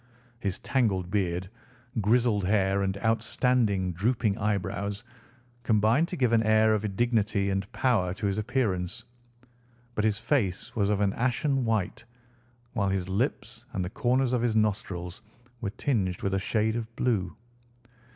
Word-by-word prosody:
His 100 Hz, -5 st, -2 dB
tangled 100 Hz, -9 st, 0 dB
beard, 90 Hz, -3 st, 0 dB, 0.5 s
grizzled 110 Hz, -1 st, +2 dB
hair, 100 Hz, 0 st, +2 dB
and 95 Hz, 0 st, -1 dB
outstanding, 110 Hz, -4 st, +1 dB
drooping 110 Hz, +2 st, +1 dB
eyebrows 100 Hz, 0 st, -2 dB, 0.6 s
combined 110 Hz, +7 st, +3 dB
to 180 Hz, -, -5 dB
give 125 Hz, -7 st, +1 dB
an 115 Hz, -, +5 dB
air 110 Hz, 0 st, +4 dB
of 105 Hz, -2 st, -2 dB
dignity 105 Hz, -4 st, +1 dB
and 95 Hz, +1 st, -2 dB
power 110 Hz, -9 st, +1 dB
to 105 Hz, -, -4 dB
his 100 Hz, +1 st, 0 dB
appearance, 105 Hz, -6 st, -1 dB, 0.9 s
but 105 Hz, -, -1 dB
his 110 Hz, -2 st, +2 dB
face 105 Hz, -9 st, -1 dB
was 100 Hz, -3 st, +1 dB
of 105 Hz, -1 st, +1 dB
an 100 Hz, -1 st, +2 dB
ashen 130 Hz, +2 st, 0 dB
white, 110 Hz, -5 st, -1 dB, 0.7 s
while 100 Hz, -5 st, 0 dB
his 95 Hz, -1 st, -1 dB
lips 115 Hz, +2 st, -2 dB
and 95 Hz, -3 st, -1 dB
the 90 Hz, -, -6 dB
corners 130 Hz, -1 st, +1 dB
of 125 Hz, -, +2 dB
his 120 Hz, -2 st, +1 dB
nostrils 100 Hz, -3 st, -1 dB, 0.4 s
were 105 Hz, -, -1 dB
tinged 100 Hz, -6 st, -1 dB
with 95 Hz, -, 0 dB
a 95 Hz, -, +2 dB
shade 110 Hz, +3 st, 0 dB
of 115 Hz, 0 st, -5 dB
blue. 100 Hz, -8 st, 0 dB
105 Hz, 150 wpm, -28 LUFS, 95-120 Hz, 0.9 s, an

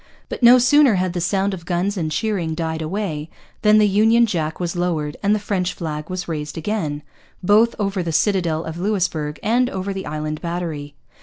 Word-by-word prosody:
But -, -, -6 dB
no 240 Hz, +1 st, +8 dB
sooner 255 Hz, -1 st, +5 dB
had 185 Hz, -1 st, 0 dB
the 175 Hz, -, -2 dB
sound 195 Hz, +3 st, 0 dB
of 175 Hz, -3 st, -7 dB
guns 180 Hz, +4 st, -1 dB
and 160 Hz, -5 st, -2 dB
cheering 180 Hz, -4 st, -1 dB
died 160 Hz, -1 st, -3 dB
away 160 Hz, -3 st, -3 dB, 0.3 s
than 215 Hz, -1 st, +5 dB
the 210 Hz, -1 st, +5 dB
Union 220 Hz, +4 st, +4 dB
Jack 160 Hz, -7 st, -2 dB
was 175 Hz, 0 st, -2 dB
lowered 165 Hz, -4 st, -1 dB
and 205 Hz, +1 st, +3 dB
the -, -, -1 dB
French 185 Hz, -3 st, -2 dB
flag 155 Hz, -1 st, -5 dB
was 185 Hz, -1 st, -4 dB
raised 150 Hz, -2 st, -4 dB
again, 160 Hz, -5 st, -3 dB, 0.4 s
both 215 Hz, +5 st, +4 dB
over 200 Hz, -3 st, -1 dB
the 170 Hz, -1 st, -2 dB
citadel 165 Hz, -1 st, +1 dB
of 160 Hz, +1 st, -6 dB
Louisbourg 175 Hz, -7 st, -1 dB
and 245 Hz, +3 st, +2 dB
over 190 Hz, +1 st, -4 dB
the 190 Hz, 0 st, -5 dB
Island 155 Hz, 0 st, -4 dB
Battery. 165 Hz, -4 st, -4 dB
180 Hz, 190 wpm, -21 LUFS, 160-205 Hz, 0.4 s, no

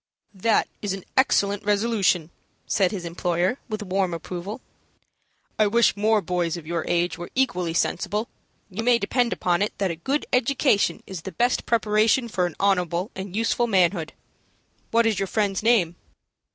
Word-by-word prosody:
"That 210 Hz, +3 st, +2 dB
is 205 Hz, -2 st, -2 dB
an 195 Hz, -2 st, -6 dB
excellent 205 Hz, -6 st, +2 dB
resolution," 205 Hz, -5 st, +1 dB, 0.3 s
said 195 Hz, -3 st, +2 dB
his 185 Hz, -4 st, -5 dB
employer, 175 Hz, +6 st, -1 dB
with 215 Hz, -1 st, -3 dB
warm 185 Hz, -2 st, -1 dB
approval. 180 Hz, +6 st, -6 dB, 1.0 s
"I 215 Hz, -, +5 dB
wish 235 Hz, +1 st, +3 dB
more 215 Hz, 0 st, +2 dB
boys 175 Hz, -1 st, -1 dB
of 165 Hz, -, -10 dB
your 170 Hz, 0 st, -2 dB
age 175 Hz, -1 st, 0 dB
were 175 Hz, -, -6 dB
equally 180 Hz, -11 st, 0 dB
sensible. 210 Hz, +5 st, -1 dB, 0.4 s
You 195 Hz, +4 st, -4 dB
may 240 Hz, +1 st, +4 dB
depend 235 Hz, +3 st, 0 dB
upon 175 Hz, 0 st, 0 dB
it 205 Hz, -, -1 dB
that 195 Hz, -3 st, 0 dB
a -, -, -4 dB
good 270 Hz, -, -2 dB
education 255 Hz, -3 st, +2 dB
is 190 Hz, -4 st, -7 dB
the 190 Hz, -, -7 dB
best 245 Hz, +4 st, 0 dB
preparation 225 Hz, +2 st, +2 dB
for 180 Hz, -4 st, 0 dB
an 175 Hz, -, -9 dB
honorable 180 Hz, 0 st, +1 dB
and 190 Hz, 0 st, -6 dB
useful 230 Hz, +2 st, +1 dB
manhood. 180 Hz, -5 st, +1 dB, 0.8 s
What 230 Hz, 0 st, +3 dB
is 220 Hz, -4 st, +1 dB
your 195 Hz, -, -1 dB
friend's 200 Hz, -1 st, 0 dB
name?" 210 Hz, -7 st, +3 dB
200 Hz, 165 wpm, -24 LUFS, 175-225 Hz, 1.0 s, I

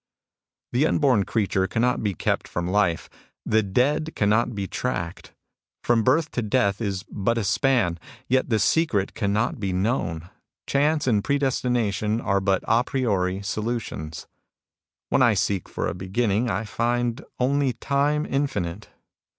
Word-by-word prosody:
" -, -, -68 dB
The 135 Hz, +6 st, +3 dB
unborn 130 Hz, -12 st, +2 dB
creature 95 Hz, -4 st, 0 dB
cannot 120 Hz, +5 st, +1 dB
be 100 Hz, -3 st, -1 dB
kept -, -, -1 dB
from 85 Hz, -, -3 dB
life. 90 Hz, -3 st, +1 dB, 0.4 s
The 110 Hz, -, +3 dB
dead 140 Hz, +10 st, 0 dB
cannot 110 Hz, +3 st, +2 dB
be 100 Hz, -1 st, -2 dB
tracked. 90 Hz, -6 st, -4 dB, 0.5 s
From 120 Hz, -1 st, +3 dB
birth 145 Hz, +5 st, +2 dB
to 125 Hz, -, -1 dB
death 105 Hz, -2 st, +1 dB
is 100 Hz, -3 st, -2 dB
but 115 Hz, +1 st, -1 dB
a 115 Hz, -, 0 dB
span; 100 Hz, -4 st, +1 dB, 0.3 s
yet 130 Hz, +1 st, +1 dB
the 110 Hz, -, +3 dB
secret 105 Hz, -, +1 dB
cannot 105 Hz, +4 st, 0 dB
be 100 Hz, -2 st, -2 dB
known. 90 Hz, -5 st, -1 dB, 0.4 s
Chance 150 Hz, +2 st, +1 dB
and 110 Hz, -6 st, +2 dB
Predestination 120 Hz, -6 st, 0 dB
are 100 Hz, -4 st, 0 dB
but 95 Hz, -1 st, +1 dB
d 115 Hz, +2 st, +4 dB
priori 100 Hz, -8 st, -1 dB
solutions. 105 Hz, -8 st, -4 dB, 0.4 s
" -, -, -69 dB
When -, -, +2 dB
I 120 Hz, -4 st, +5 dB
seek 100 Hz, -1 st, -1 dB
for -, -, -2 dB
a -, -, -2 dB
beginning, 100 Hz, +5 st, 0 dB
I 95 Hz, +1 st, -1 dB
find 120 Hz, +2 st, -1 dB, 0.2 s
only 135 Hz, +1 st, +2 dB
time 145 Hz, +5 st, 0 dB
infinite. 105 Hz, -9 st, -2 dB
110 Hz, 150 wpm, -24 LUFS, 100-125 Hz, 0.5 s, I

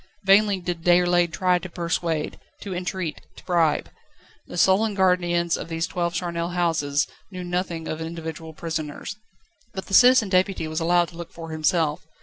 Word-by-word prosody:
Vainly 195 Hz, 0 st, +4 dB
did 175 Hz, -2 st, -4 dB
Déroulède 175 Hz, 0 st, +3 dB
try 180 Hz, +1 st, +2 dB
to 185 Hz, -, -8 dB
persuade, 170 Hz, -2 st, -2 dB, 0.2 s
to 195 Hz, -, -5 dB
entreat, 180 Hz, -2 st, -4 dB
to -, -, -15 dB
bribe. 165 Hz, -4 st, +1 dB, 0.6 s
The -, -, -8 dB
sullen 200 Hz, +4 st, +3 dB
guardians 175 Hz, -3 st, +2 dB
of -, -, -6 dB
these 165 Hz, 0 st, -1 dB
twelve 175 Hz, -1 st, -2 dB
charnel 170 Hz, -1 st, -2 dB
houses 160 Hz, -5 st, +1 dB, 0.2 s
knew 185 Hz, -2 st, -7 dB
nothing 175 Hz, -2 st, -3 dB
of 155 Hz, -, -4 dB
individual 160 Hz, -1 st, -6 dB
prisoners. 160 Hz, +3 st, -5 dB, 0.6 s
But 190 Hz, -, -5 dB
the -, -, -9 dB
Citizen 245 Hz, -1 st, +6 dB
Deputy 185 Hz, -3 st, +1 dB
was 155 Hz, +1 st, -3 dB
allowed 175 Hz, +1 st, +2 dB
to 165 Hz, -, -14 dB
look 170 Hz, -1 st, -8 dB
for 165 Hz, -1 st, -9 dB
himself. 155 Hz, -1 st, 0 dB
175 Hz, 160 wpm, -24 LUFS, 165-185 Hz, 0.6 s, Citizen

